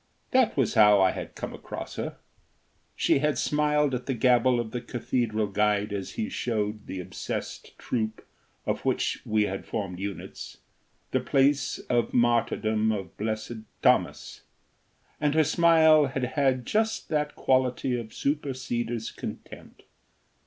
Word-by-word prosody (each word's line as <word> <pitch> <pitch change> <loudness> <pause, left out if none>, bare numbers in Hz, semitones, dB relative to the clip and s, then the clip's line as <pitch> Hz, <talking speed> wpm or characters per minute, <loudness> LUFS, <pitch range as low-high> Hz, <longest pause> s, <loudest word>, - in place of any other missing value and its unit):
That 255 - +3
was 135 -5 +2
how 105 -2 +6
I 95 -1 +4
had - - -7
come - - -5
across - - -7
her. - - -4 0.8
She - - +2
had 150 +1 +1
smiled 150 -1 +1
at 125 0 -3
the 135 - 0
gabble 125 +1 +3
of 115 -2 -3
the 125 - -3
cathedral 115 -3 -1
guide 105 0 +1
as 100 -2 -4
he 225 -1 -2
showed 105 - -2
the 95 - -5
obsessed 90 - -6
troop, 110 -2 -3 0.4
of - - -2
which - - 0
we 110 0 +2
had 95 -1 -3
formed 95 -5 -4
units, 100 0 -6 0.5
the - - +2
place 140 +1 +2
of 120 -2 0
martyrdom 110 -2 +2
of 95 -5 -5
Blessed 110 +2 -3 0.3
Thomas, - - +1 0.8
and 150 0 +1
her 160 - +5
smile 160 -2 +5
had 130 -1 -3
had 130 -4 +1
just 220 - 0
that 150 -1 -1
quality 130 -1 +1
of 120 -2 -4
superseder's 125 -5 -2
contempt. - - -9
120 Hz, 140 wpm, -27 LUFS, 110-140 Hz, 0.8 s, how